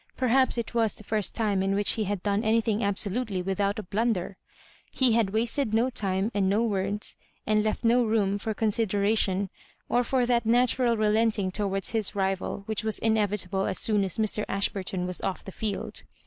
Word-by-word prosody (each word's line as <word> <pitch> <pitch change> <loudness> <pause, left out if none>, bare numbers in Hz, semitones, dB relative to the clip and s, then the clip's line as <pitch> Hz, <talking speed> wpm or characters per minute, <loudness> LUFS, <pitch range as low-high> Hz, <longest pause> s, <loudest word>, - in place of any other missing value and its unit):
Perhaps 260 0 +2
it 235 0 -3
was 225 -3 +1
the - - -8
first 215 -1 0
time 205 -4 +1
in 195 +1 0
which 205 0 +3
he 220 - -1
had 200 -2 -3
done 205 +1 0
anything 220 -1 +1
absolutely 200 0 -1
without 200 +2 -1
a 215 - -4
blunder. 200 -1 -1 0.6
He 260 -2 +2
had 225 -3 +2
wasted 225 +2 0
no 245 +3 +2
time, 195 -1 -1
and 195 -2 +1
no 210 +4 +2
words, 205 -1 -1 0.3
and 215 0 +2
left 215 +2 -2
no 240 +2 +4
room 205 -3 +1
for 220 +1 -3
con 220 0 +1
sideration, 200 -2 +1 0.4
or 245 +1 +2
for 255 0 +1
that 240 -1 +2
natural 240 +1 +2
relenting 215 -2 +1
towards 195 -1 -1
his 220 -2 0
rival 195 0 -2
which 220 +1 -2
was 220 -1 0
inevitable 205 -3 0
as - - -1
soon 210 -2 +2
as 190 - -2
Mr. 215 -1 0
Ash 195 +1 +1
burton 185 -2 -3
was 180 0 -2
off 190 - -3
the 195 - -7
field. 205 0 -4
210 Hz, 190 wpm, -27 LUFS, 195-225 Hz, 0.6 s, no